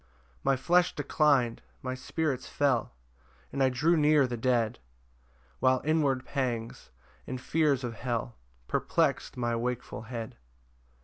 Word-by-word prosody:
3 60 - -33 0.4
My 135 - +4
flesh 175 +6 +2
declin'd, 140 -5 +2 0.2
my 130 -1 -2
spirits 130 0 -2
fell, 130 - 0 0.6
And 140 - -1
I 130 - +5
drew 150 +7 +2
near 150 -2 +5
the 125 -1 -3
dead, 120 -1 +1 0.8
While 130 0 +3
inward 145 -5 +2
pangs, 120 - -3 0.4
and 130 0 -4
fears 140 0 +1
of 120 -2 -3
hell 120 +1 -3 0.3
Perplex'd - - 0
my 120 -1 0
wakeful 120 -2 -3
head. 115 0 -6
130 Hz, 130 wpm, -29 LUFS, 120-145 Hz, 0.8 s, I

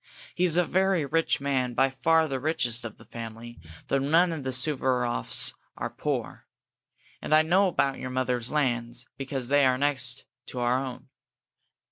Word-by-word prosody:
He 180 - +1
is 170 -1 +1
a 180 - +5
very 190 -4 +2
rich 165 +4 +1
man 130 -3 -1
by 135 +1 +3
far 160 +4 +3
the 135 -3 -2
richest 125 -5 0
of 115 -3 -7
the - - -16
family, 115 0 -8 0.3
though 135 - +1
none 165 +6 +3
of 160 -3 -4
the 130 - -3
Suvaroffs 130 - 0 0.2
are - - -3
poor. - - -4 0.7
And 155 - +2
I 155 - +6
know 185 +5 +4
about 140 -6 0
your 130 - -5
mother's 125 -2 -1
lands, 120 -4 -1
because 135 -2 -4
they 145 0 +4
are 130 -1 +4
next 130 -3 -1 0.2
to 125 - -6
our 125 +2 +1
own." 130 0 -8
135 Hz, 170 wpm, -27 LUFS, 125-155 Hz, 0.7 s, I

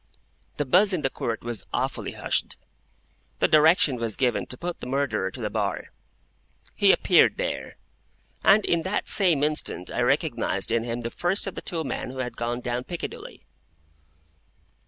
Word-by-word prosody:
The 145 - -1
buzz 190 +9 +4
in 165 -5 -1
the 135 - 0
Court 115 -1 -4
was 120 -2 -4
awfully - - -2
hushed. - - -2 0.8
The - - +3
direction 155 -3 +4
was 115 -2 -2
given 125 -3 0
to 125 - -5
put 175 +3 -5
the - - -7
Murderer 135 -7 -1
to 125 - -9
the 105 -3 -3
bar. 100 -3 -2 0.8
He - - +5
appeared - - +4
there. - - -4 0.7
And 205 +1 +5
in 170 - +1
that 190 +4 -2
same 175 -8 +3
instant 150 - -1
I - - -1
recognised 100 +3 0
in 115 0 +2
him 120 0 -3
the 115 0 -4
first 180 +4 0
of 195 - -4
the - - -7
two 165 -2 -1
men 135 - -4
who 130 - -9
had 125 -1 -4
gone 120 +1 -3
down 120 0 -3
Piccadilly. 175 -2 -7
130 Hz, 170 wpm, -25 LUFS, 115-170 Hz, 0.8 s, He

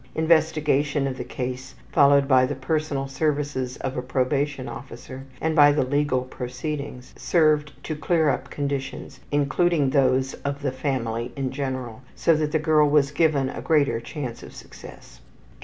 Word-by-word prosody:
Investigation 155 -3 +2
of 135 -1 -2
the - - -2
case, 130 +1 -5 0.2
followed 140 0 +5
by 130 -2 +5
the 145 - -3
personal 140 0 -2
services 140 -2 -2
of 130 - -4
a - - -2
probation 135 +2 -1
officer 130 +1 -9
and 160 0 -1
by 145 -2 +7
the 145 -1 +1
legal 145 -1 +1
proceedings, 130 +1 -6
served 155 -3 +2
to 155 - -4
clear 160 +1 +1
up - - -2
conditions, 140 -2 -4
including 145 +1 +2
those 130 -1 +2
of 140 0 -3
the 135 - 0
family 125 -3 -2
in 135 -2 -2
general, 130 -4 -4
so 165 - +3
that 150 -1 -1
the 160 - +2
girl 155 -1 +3
was 145 -1 +3
given 145 -3 +2
a - - -6
greater 140 -8 +2
chance 125 -1 -6
for - - -11
success. - - -13
140 Hz, 155 wpm, -24 LUFS, 130-150 Hz, 0.2 s, by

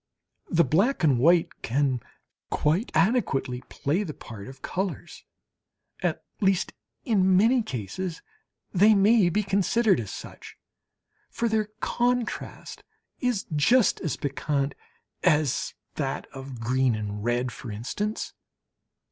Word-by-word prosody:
The 170 -1 +4
black 190 - +2
and 140 -6 +4
the - - -1
white 170 +3 +3
can 130 +1 +1 0.5
quite 165 +10 +1
adequately 155 - +1
play 155 +8 -1
the 165 -8 -5
part 105 -3 -9
of 135 0 -12
colours 190 0 -4 0.8
(at - - -1 0.2
least, 195 -3 +1 0.3
in 190 -6 +4
many 235 +5 +4
cases 160 - -5 0.5
they 210 +3 +6
may 200 -1 +5
be 210 +5 +1
considered 200 +1 +2
as 105 -5 -5
such), - - -9 0.7
for 235 - -1
their 220 -1 +1 0.2
contrast 245 -1 -2 0.4
is 245 -5 0
just 230 - +4
as 160 -7 -2
piquant 140 0 -1 0.5
as 150 -6 +2 0.2
that 135 -3 -3
of 135 -2 -8
green 125 +1 +2
and 105 -1 -4
red, 120 +2 0
for 120 - -9
instance. 205 - -3
165 Hz, 120 wpm, -26 LUFS, 130-210 Hz, 0.8 s, they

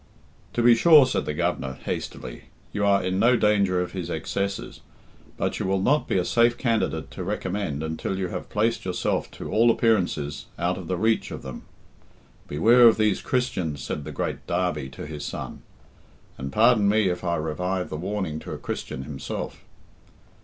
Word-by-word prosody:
"To 120 - 0
be 120 0 +8
sure," 150 +2 +7
said 130 - -1
the 75 - -1
Governor 65 -3 -1
hastily, - - -5 0.3
"you 105 - -1
are 100 -1 +3
in 95 +1 -1
no 120 +3 +5
danger 100 -4 +3
of 90 - -3
his 90 -3 -5
excesses; 100 0 -3 0.6
but - - -1
you - - -1
will 95 0 +1
not 145 +10 +2
be - - +1
a 90 - +1
safe 120 +3 +3
candidate 115 - -1
to 95 - -6
recommend 95 -5 -3
until 80 +4 -3
you 95 -2 -2
have - - -6
placed 110 +2 0
yourself 90 -1 -1
to - - -7
all 115 +2 +4
appearances 90 - +1
out 90 +2 -1
of 90 - -8
the 90 - -1
reach 110 +3 +1
of - - -7
them. 65 -2 -8 0.8
'Beware 115 +11 +6
of 115 - +5
these 110 -2 +2
Christians,' 110 - -1
said 75 - -4
the - - -7
great - - -4
Derby 85 -6 -1
to - - -8
his 75 -1 -7
son; - - -6 0.7
and 65 +1 -6
pardon 110 - +4
me 105 -1 +3
if 90 0 -2
I 85 -1 0
revive 90 +4 -2
the - - -3
warning 90 -2 -3
to - - -7
a - - -5
Christian 65 - -5
himself." 70 -1 -6
95 Hz, 180 wpm, -25 LUFS, 80-110 Hz, 0.8 s, be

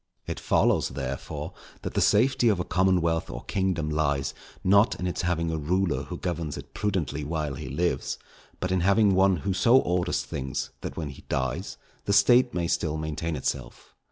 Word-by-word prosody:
] - - -48
It - - -4
follows, - - +2
therefore, 65 +1 -5 0.3
that - - -4
the - - +1
safety 125 +2 +4
of 100 -4 +2
a - - 0
commonwealth 90 -3 +1
or - - -6
kingdom 95 -5 -1
lies, 70 -3 0 0.3
not 100 +4 +4
in 90 - -2
its 90 - -2
having 85 -2 0
a 80 - -2
ruler 80 -3 0
who - - -6
governs 85 -5 -3
it 70 0 -10
prudently 85 -8 -1
while 75 -1 -2
he 65 0 -6
lives, 85 +6 -1 0.4
but 90 - -2
in 95 - +2
having 100 +3 +4
one 95 0 +4
who 100 - +1
so 115 +7 +5
orders 90 -6 +1
things, 65 +1 -4
that - - -6
when 80 -3 -3
he 70 - -11
dies, 65 +7 -2 0.3
the 100 - +1
State 120 +5 +5
may 85 -5 -1
still 80 -2 0
maintain 80 +1 -3
itself. 65 -3 -4
85 Hz, 185 wpm, -27 LUFS, 75-95 Hz, 0.4 s, so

